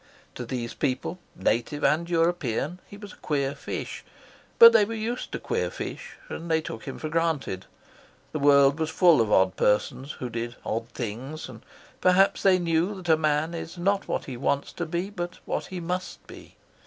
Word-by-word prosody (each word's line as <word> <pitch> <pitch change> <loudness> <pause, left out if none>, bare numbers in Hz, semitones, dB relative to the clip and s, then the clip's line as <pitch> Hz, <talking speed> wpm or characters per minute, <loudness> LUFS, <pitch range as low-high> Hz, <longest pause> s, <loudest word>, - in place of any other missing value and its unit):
To 125 - -7
these 120 -1 -4
people, 140 +6 -2 0.2
native 120 +9 -1
and 170 +3 +2
European, 165 -2 0
he 200 - -11
was 205 -1 -10
a - - -17
queer 140 -2 -1
fish, - - -6 0.5
but 465 0 +10
they - - +6
were 225 +3 -3
used 225 +3 -3
to - - -2
queer - - -2
fish, - - -7
and 170 +1 -7
they 160 0 +3
took 115 -8 -7
him 135 - -6
for 155 - -4
granted; 155 - -1 0.6
the 155 - -3
world 140 +1 +5
was 160 -1 0
full 160 -4 +5
of 110 -2 0
odd 95 -1 +4
persons, 125 +6 0
who 125 - -5
did 120 0 -4
odd 115 +1 -3
things; 125 +7 -5
and 115 -3 -11 0.4
perhaps 185 +2 +4
they 190 -2 +5
knew 170 +3 0
that 180 -3 -7
a - - +6
man 155 +1 0
is 165 +1 -6
not 195 +3 0
what - - -2
he 130 -3 -6
wants 140 +2 -1
to 170 - -4
be, 175 +5 -3
but 175 -2 -5
what - - -3
he 185 -1 -6
must 180 +2 -4
be. - - -13
155 Hz, 190 wpm, -26 LUFS, 130-175 Hz, 0.6 s, but